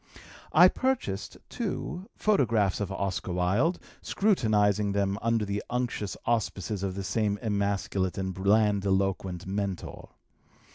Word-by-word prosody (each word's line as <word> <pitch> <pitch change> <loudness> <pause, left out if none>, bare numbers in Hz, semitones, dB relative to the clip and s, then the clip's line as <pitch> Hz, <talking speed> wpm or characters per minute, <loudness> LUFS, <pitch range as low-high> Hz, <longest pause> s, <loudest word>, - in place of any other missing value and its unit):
I 175 +3 +8
purchased, 245 - -2
too, 180 +3 -4
photographs 115 - +2
of 100 -2 -3
Oscar 95 -2 -2
Wilde, 100 - +2 0.2
scrutinizing 105 - +2
them 100 0 0
under 115 -1 +1
the 100 0 -3
unctuous 120 -4 -2
auspices 105 -3 -1
of 95 -1 -2
this 95 -1 -4
same 105 -2 0
emasculate 100 -3 -1
and 95 -1 -2
blandiloquent 95 -2 +1
mentor. 95 -1 -4
100 Hz, 110 wpm, -28 LUFS, 95-115 Hz, 0.2 s, I